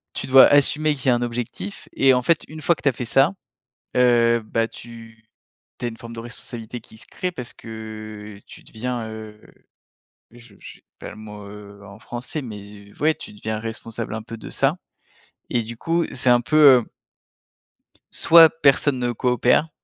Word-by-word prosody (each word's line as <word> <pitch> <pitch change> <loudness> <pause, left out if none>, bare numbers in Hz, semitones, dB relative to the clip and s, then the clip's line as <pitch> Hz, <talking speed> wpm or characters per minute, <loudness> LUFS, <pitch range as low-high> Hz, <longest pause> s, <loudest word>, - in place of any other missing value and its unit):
tu - - -3
dois 130 0 +8
assumer 150 +2 +3
qu'il 135 -1 -6
y - - +6
a 125 - +5
un 120 - -2
objectif 115 -5 -5
et 135 -1 +4
en 125 - +2
fait, 160 +4 +1
une 155 +1 -10
fois 170 - +2
que - - -16
tu 145 - +4
as - - +1
fait 125 - -5
ça, 135 +9 +3 0.6
heu, 120 -2 +4
bah, 115 +1 -1
tu 115 -1 -13 0.5
tu 125 - -3
as - - 0
une 115 - -9
forme 115 0 -10
de 115 - -7
responsabilité 120 0 -7
qui 110 - -17
se - - -7
crée 180 -1 -4
parce 125 -7 -8
que 110 -2 -9
tu - - -13
deviens, 120 0 -5
heu, 110 -1 -10 0.9
je 120 -3 -17
j'ai - - -13 0.2
pas - - -8
le - - -11
mot, 105 -1 -10
heu, 100 0 -12
en 100 +1 -13
français, 120 +7 -5
mais, 100 -3 -10
ouais, 155 +1 +3
tu - - -11
deviens 110 +1 -4
responsable 115 0 -6
un 110 - -5
peu 115 +1 -9
de - - -9
ça 140 +4 +1 0.7
et 120 - +1
du 115 +1 -9
coup, 165 +5 0
c'est 125 0 0
un 120 0 +5
peu, 155 +6 0 0.2
heu - - -12 1.3
soit 165 -1 +8
personne 145 -3 +2
ne 120 0 -1
coopère, 125 +5 +2
120 Hz, 190 wpm, -22 LUFS, 110-130 Hz, 1.3 s, dois